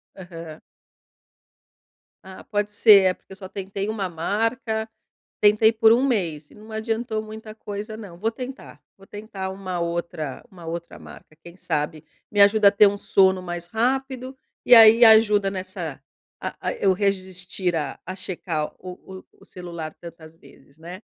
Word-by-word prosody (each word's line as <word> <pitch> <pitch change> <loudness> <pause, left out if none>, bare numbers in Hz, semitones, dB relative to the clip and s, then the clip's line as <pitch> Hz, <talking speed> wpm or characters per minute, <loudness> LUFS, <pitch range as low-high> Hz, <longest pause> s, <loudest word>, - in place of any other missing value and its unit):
Aham. 165 -4 -10 1.7
Ah 190 0 -11
pode 205 -1 -2
ser, 210 -1 +7
é 185 -1 +3
porque 190 - -16
eu - - -11
só 190 -1 -9
tentei 195 +1 -5
uma 205 -4 -3
marca, 220 +6 -2 0.5
tentei 215 +2 +5
por 220 0 +5
1 245 +3 +2
mês 170 - -2
e - - -17
não 215 +1 -14
adiantou 220 0 -2
muita 215 0 -10
coisa 210 0 -7
não. 200 -6 -10
Vou 220 +5 -1
tentar, 255 +3 -9 0.2
vou 195 - -17
tentar 205 -2 -7
uma 185 -2 -5
outra 170 -4 -4
uma 175 -4 -13
outra 170 +1 -6
marca, 155 - -14
quem 170 0 -13
sabe 150 -3 -3 0.3
me 205 - +3
ajuda 205 0 +6
a - - -5
ter 205 0 +6
um 205 0 -1
sono 190 -2 +2
mais 175 -1 -6
rápido 260 +4 -2 0.3
e 245 - +6
aí 230 +1 +9
ajuda 210 -3 +5
nessa 185 -6 -6 0.4
a - - -5
a - - -2
eu 195 -1 +2
resistir 185 -2 -2
a 150 -3 -3
a 185 - -7
checar 170 -5 -4
o 185 +1 -10
o - - -36 0.2
o - - -17
celular 170 -3 -8
tantas 165 -2 -13
vezes, 140 -2 -21
né? 180 +5 -10
195 Hz, 165 wpm, -23 LUFS, 175-220 Hz, 1.7 s, aí